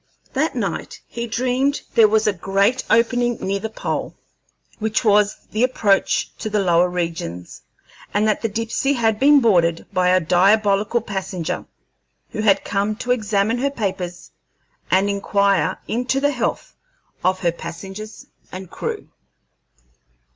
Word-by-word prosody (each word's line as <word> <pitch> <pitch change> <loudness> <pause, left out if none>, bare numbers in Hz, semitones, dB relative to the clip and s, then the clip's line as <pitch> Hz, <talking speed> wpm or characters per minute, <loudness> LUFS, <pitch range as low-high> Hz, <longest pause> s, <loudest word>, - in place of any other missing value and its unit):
That - - 0
night - - -3
he 235 0 -5
dreamed 255 +4 0
that - - -10
there 225 -2 +6
was 215 0 +2
a 210 - +2
great 200 +7 +1
opening 240 0 +2
near 195 +1 -2
the 220 - -4
pole, 220 - -4 0.6
which 220 +2 -1
was 210 -1 +3
the 215 - -1
approach 210 -6 +1
to 220 - -3
the 210 - 0
lower 180 -2 +3
regions, 165 - -5 0.5
and 210 +1 +1
that 215 - +1
the 225 - -1
Dipsey 230 +6 -1
had 225 -4 +1
been 285 +1 +6
boarded 170 -7 +2
by 180 0 +2
a 185 0 +5
diabolical 200 +5 +2
passenger, 190 -5 -4 0.7
who - - -3
had 200 -2 +3
come 205 +1 -1
to 245 +3 -3
examine 215 -1 +1
her 280 +2 +1
papers 185 -8 -4 0.6
and 190 +2 +3
inquire 200 -4 +1
into 250 +4 0
the 285 +1 +2
health 250 -4 -3 0.5
of 185 0 +1
her 170 - +2
passengers 190 +6 -8 0.3
and 185 -1 -8
crew. - - -5
205 Hz, 145 wpm, -21 LUFS, 190-230 Hz, 0.7 s, there